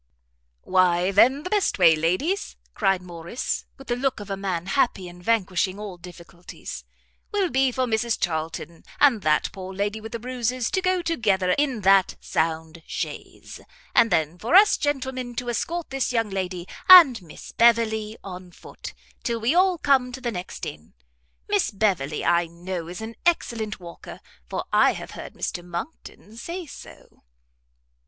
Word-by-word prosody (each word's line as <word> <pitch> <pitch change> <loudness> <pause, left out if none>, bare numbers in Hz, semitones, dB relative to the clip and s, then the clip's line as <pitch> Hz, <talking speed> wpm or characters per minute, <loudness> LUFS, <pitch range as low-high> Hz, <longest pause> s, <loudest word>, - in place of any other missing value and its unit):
"Why 185 0 +3
then 255 +9 +4
the 365 - -6
best 415 -2 +1
way, 170 -4 +6
ladies," 185 - -1 0.2
cried 195 -3 +1
Morrice, 175 +6 -4
with 270 - -13
the 240 - -1
look 265 -1 -1
of 205 -1 -8
a - - 0
man 185 -3 -3
happy 195 -3 0
in 175 0 -12
vanquishing 190 -2 0
all 205 -4 -7
difficulties, 175 -1 -10 0.5
"will 395 -4 0
be 265 0 +2
for 255 +1 0
Mrs 230 0 0
Charlton, 165 0 -3 0.2
and 260 -7 +5
that 155 -3 +1
poor 190 -1 -8
lady 205 +3 -2
with 225 +1 -9
the - - -2
bruises, 250 0 -2
to 375 - +1
go 370 -1 +1
together 205 - +1
in 270 -2 0
that 195 -1 +4
sound 160 0 -2
chaise, - - -6 0.3
and 230 - +4
then 160 0 0
for 235 - 0
us 405 +2 +7
gentlemen 260 -4 -3
to 245 0 -2
escort 335 +7 -3
this 270 -1 -1
young 225 -4 0
lady 185 -2 -4 0.2
and 320 - +10
Miss 165 -4 -12
Beverley 220 -2 +2
on 185 -2 -9
foot, - - -11 0.3
till 235 -1 -2
we 230 +6 +1
all 365 0 +3
come 270 -4 +2
to 260 - -6
the 245 -2 -3
next 180 -3 -6
inn. 75 -2 -9 0.5
Miss - - +1
Beverley, 185 -8 -1
I 170 0 +3
know, 170 0 -6
is 175 +4 -7
an 220 +1 -6
excellent 230 -11 0
walker, 170 -2 -10 0.3
for - - -3
I - - +5
have - - -8
heard - - -9
Mr 175 - -4
Monckton 190 - -8
say 345 +8 -6
so." 290 - -14
215 Hz, 165 wpm, -24 LUFS, 180-255 Hz, 0.5 s, and